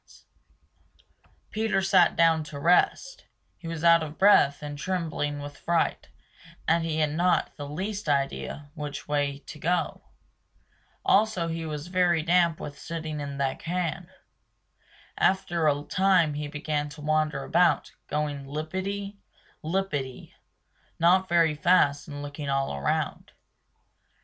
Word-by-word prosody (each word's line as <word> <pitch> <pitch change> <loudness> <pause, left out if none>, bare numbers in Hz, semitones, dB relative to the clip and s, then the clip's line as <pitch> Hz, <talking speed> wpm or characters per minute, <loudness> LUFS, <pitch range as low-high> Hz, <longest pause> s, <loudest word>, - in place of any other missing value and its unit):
Peter 215 -2 0
sat 190 -2 +4
down 165 -1 +4
to 150 -1 -9
rest; 180 - +2 0.3
he 170 - -9
was 165 -1 -5
out 170 0 +6
of 155 0 -6
breath 155 -8 +5
and 145 -1 -6
trembling 160 -5 -2
with 145 0 -8
fright, 170 -1 0 0.6
and 165 +1 +3
he 160 -1 -2
had 150 -1 +1
not 175 +3 +1
the 145 -1 -7
least 195 +3 -4
idea 145 +1 -2
which 150 -3 -6
way 145 -1 0
to 150 - -10
go. 170 +1 -1 1.0
Also 195 -5 +3
he 165 0 -4
was 150 -1 -5
very 175 -3 +2
damp 170 -1 +3
with 145 - -8
sitting 160 -2 -5
in 140 -1 -5
that 135 -1 -1
can. 175 0 -3 1.1
After 175 -4 +2
a 145 -1 +1
time 185 -3 +3
he 150 0 -4
began 150 0 -3
to 150 +1 -11
wander 155 -2 0
about, 170 -3 +2 0.2
going 145 -2 -3
lippity 190 +7 -4 0.4
lippity 155 -7 -3 0.6
not 185 +3 +3
very 165 -2 +4
fast 150 -3 +3
and 145 -1 -7
looking 145 0 -6
all 135 - 0
around. 70 0 -2
160 Hz, 130 wpm, -27 LUFS, 145-180 Hz, 1.1 s, out